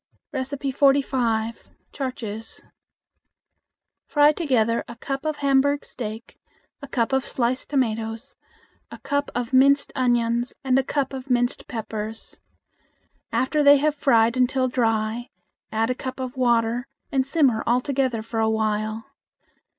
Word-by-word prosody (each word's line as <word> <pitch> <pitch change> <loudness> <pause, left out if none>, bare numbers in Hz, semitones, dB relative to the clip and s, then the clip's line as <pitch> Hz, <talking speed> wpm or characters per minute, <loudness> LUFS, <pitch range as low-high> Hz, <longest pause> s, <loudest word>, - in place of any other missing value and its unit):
45. 265 -4 0 0.2
Char 265 -2 -3
chiz. 225 -2 -8 1.4
Fry 295 0 +5
together 245 -8 +1
a 235 - -9
cup 275 +4 -5
of 310 - -1
Hamburg 280 0 +2
steak, 220 -1 -7 0.4
a 280 - -8
cup 245 -1 -1
of 265 -1 +2
sliced 255 0 -1
tomatoes, 230 -2 -2 0.5
a - - -9
cup 285 0 -2
of 245 0 -3
minced 280 +2 +4
onions, 240 -1 +1
and 260 0 +3
a - - +1
cup 275 0 -2
of 265 0 -7
minced 245 -1 0
peppers. 220 -1 -6 0.9
After 295 +4 +1
they 285 0 +7
have 300 +2 +1
fried 235 -5 +3
until 255 +1 +2
dry, 225 -1 0 0.4
add 225 +2 +1
a - - +1
cup 260 +1 -6
of 255 -1 -5
water 240 0 +1 0.2
and 265 -1 +2
simmer 275 -7 +2
all 240 +1 +4
together 255 -4 -1
for 225 0 -4
a 220 0 +2
while. 220 0 -1
255 Hz, 135 wpm, -24 LUFS, 225-275 Hz, 1.4 s, they